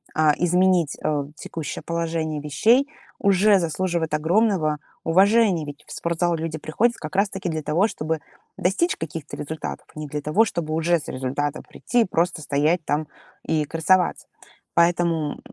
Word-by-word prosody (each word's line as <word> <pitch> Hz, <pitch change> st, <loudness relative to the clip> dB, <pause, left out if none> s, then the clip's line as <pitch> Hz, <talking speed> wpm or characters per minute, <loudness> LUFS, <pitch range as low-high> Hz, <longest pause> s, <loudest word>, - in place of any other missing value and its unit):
а, 155 Hz, -1 st, +4 dB
изменить, 180 Hz, -2 st, +2 dB
э, 145 Hz, -2 st, 0 dB
текущее 155 Hz, -5 st, -6 dB
положение 165 Hz, -2 st, -2 dB
вещей 225 Hz, -, +3 dB, 0.3 s
уже 200 Hz, 0 st, +4 dB
заслуживает 170 Hz, -1 st, -1 dB
огромного 160 Hz, 0 st, +2 dB, 0.3 s
уважения. 195 Hz, 0 st, +4 dB
Ведь 145 Hz, 0 st, -9 dB
в -, -, -12 dB
спортзал 170 Hz, 0 st, 0 dB
люди 160 Hz, -1 st, -4 dB
приходят 230 Hz, +11 st, +1 dB
как 155 Hz, -1 st, -8 dB
раз-таки 190 Hz, -3 st, 0 dB
для 160 Hz, -1 st, -2 dB
того, 170 Hz, +9 st, +2 dB
чтобы 160 Hz, -3 st, -3 dB, 0.4 s
достичь 210 Hz, -, +1 dB
каких-то 160 Hz, -1 st, -6 dB
результатов, 155 Hz, +2 st, -5 dB
а -, -, -7 dB
не 150 Hz, -, -5 dB
для 150 Hz, +1 st, -4 dB
того, 175 Hz, +10 st, +3 dB
чтобы 155 Hz, -6 st, -3 dB
уже 170 Hz, +2 st, +2 dB
с -, -, -8 dB
результатом 135 Hz, +3 st, -3 dB
прийти 245 Hz, -, -1 dB
и -, -, -2 dB
просто 170 Hz, -2 st, 0 dB
стоять 150 Hz, +3 st, +1 dB
там 150 Hz, +1 st, -1 dB, 0.4 s
и 155 Hz, -2 st, 0 dB
красоваться. 165 Hz, +4 st, +1 dB, 0.5 s
Поэтому 170 Hz, -3 st, +2 dB
165 Hz, 150 wpm, -23 LUFS, 150-185 Hz, 0.5 s, а